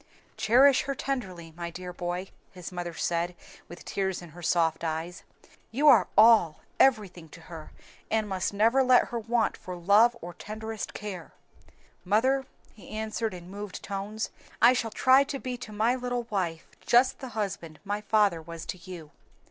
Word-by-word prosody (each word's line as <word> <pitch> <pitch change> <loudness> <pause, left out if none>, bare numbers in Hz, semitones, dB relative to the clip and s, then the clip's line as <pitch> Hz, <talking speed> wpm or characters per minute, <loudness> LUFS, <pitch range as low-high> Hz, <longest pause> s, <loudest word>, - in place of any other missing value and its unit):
"Cherish 260 +4 +5
her 275 - -2
tenderly, 185 -13 -5
my 170 0 -5
dear 180 +1 -8
boy," 175 +1 -4 0.2
his 180 0 -8
mother 175 -2 -5
said, 175 +1 -1 0.3
with 175 - -12
tears 190 -2 -2
in 175 - -11
her 175 +3 -13
soft 165 -1 +1
eyes, 165 +2 -4 0.5
"you 280 +6 +1
are 255 -6 +7
all, 215 -8 +6 0.2
everything 200 -10 +2
to 170 - -13
her, 160 -2 -10 0.4
and 220 -1 0
must 190 -2 -2
never 225 +6 +3
let 255 -1 +4
her 235 - -3
want 230 0 0
for 180 - -8
love 205 +7 +4
or 175 +1 -8
tenderest 220 +3 -7
care." 190 -6 -7 0.7
"Mother," 260 +8 +1 0.3
he 210 - -15
answered 220 -1 -3
in 175 +1 -11
moved 205 -1 -7
tones, 200 +2 -4 0.3
"I 240 +3 +7
shall 235 -3 -1
try 260 +4 +5
to 280 -1 -4
be 255 -1 -5
to 240 -3 -9
my 220 +3 +1
little 245 -1 -2
wife 170 -5 -2
just 245 +2 +3
the 265 - -7
husband 170 -7 -4
my 205 +1 -3
father 205 -5 +2
was 165 0 -9
to 185 - -6
you." 170 -4 -10
205 Hz, 170 wpm, -28 LUFS, 175-230 Hz, 0.7 s, are